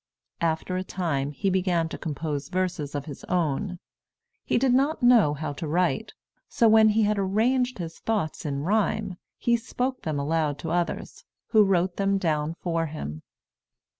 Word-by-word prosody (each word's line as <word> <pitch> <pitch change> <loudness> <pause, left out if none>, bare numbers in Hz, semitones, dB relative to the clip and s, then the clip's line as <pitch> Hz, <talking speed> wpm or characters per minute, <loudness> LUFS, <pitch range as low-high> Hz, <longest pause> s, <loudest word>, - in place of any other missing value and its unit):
After 165 +2 0
a 185 - -2
time, 160 -8 -2
he 190 +7 -1
began 180 -3 +1
to - - -6
compose 150 -2 -4
verses 180 -6 -2
of 140 -1 -3
his 145 -4 -9
own. 180 +2 -1 0.7
He - - +1
did 255 0 +3
not 275 +2 +1
know 230 -12 +5
how 145 0 -4
to 155 +3 -5
write; 175 +4 0 0.3
so 230 - +3
when 220 0 +6
he 215 +1 +3
had 210 0 +1
arranged 245 +6 +1
his 165 -3 -6
thoughts 210 -9 -2
in 140 -2 -3
rhyme, 205 0 0 0.2
he 235 - +2
spoke 250 +3 -3
them 155 -3 -2
aloud 150 0 0
to 160 +2 -5
others, 175 0 -2 0.3
who 215 -2 +6
wrote 185 -2 +1
them 195 0 +2
down 160 -3 -1
for 165 -2 -1
him. 80 - -6
180 Hz, 165 wpm, -26 LUFS, 155-210 Hz, 0.7 s, when